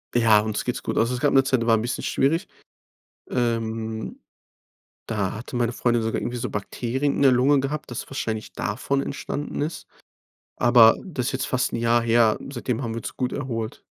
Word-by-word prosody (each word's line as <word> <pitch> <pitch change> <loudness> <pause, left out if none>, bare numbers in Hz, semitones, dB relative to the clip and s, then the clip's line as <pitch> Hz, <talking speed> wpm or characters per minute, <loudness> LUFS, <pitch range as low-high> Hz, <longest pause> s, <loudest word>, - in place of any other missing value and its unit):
Ja, 115 -3 +5
uns 105 0 -2
geht's 125 - -3
gut. - - -3
Also, 115 +2 +2
es - - -4
gab 145 - +2
'ne 135 - +6
Zeit, 130 -2 +1
die - - -1
war 115 - +6
'n - - -2
bisschen 120 +3 -3
schwierig. 155 +6 +1 0.8
Ähm. 115 -2 -2 0.9
Da 105 -4 -2
hatte 120 +3 -6
meine 120 -1 0
Freundin 120 -1 +1
sogar 110 0 -1
irgendwie 120 0 -3
so 120 - -3
Bakterien 125 +7 -2
in - - -1
der 135 - +7
Lunge 135 +3 +4
gehabt, 145 +1 -4
das 120 - -6
wahrscheinlich 110 -5 -4
davon 135 +6 -1
entstanden 145 +1 -4
ist. 155 +3 -4 0.7
Aber 120 -2 +6
das 140 -10 -4
ist - - 0
jetzt 130 -1 -1
fast 130 -1 0
'n - - 0
Jahr 115 0 +3
her. 115 -1 +3
Seitdem 125 -2 -3
haben 115 -3 -3
wir 115 - -3
uns - - -8
gut 125 -1 -1
erholt. 115 -5 -4
120 Hz, 200 wpm, -24 LUFS, 115-130 Hz, 0.9 s, der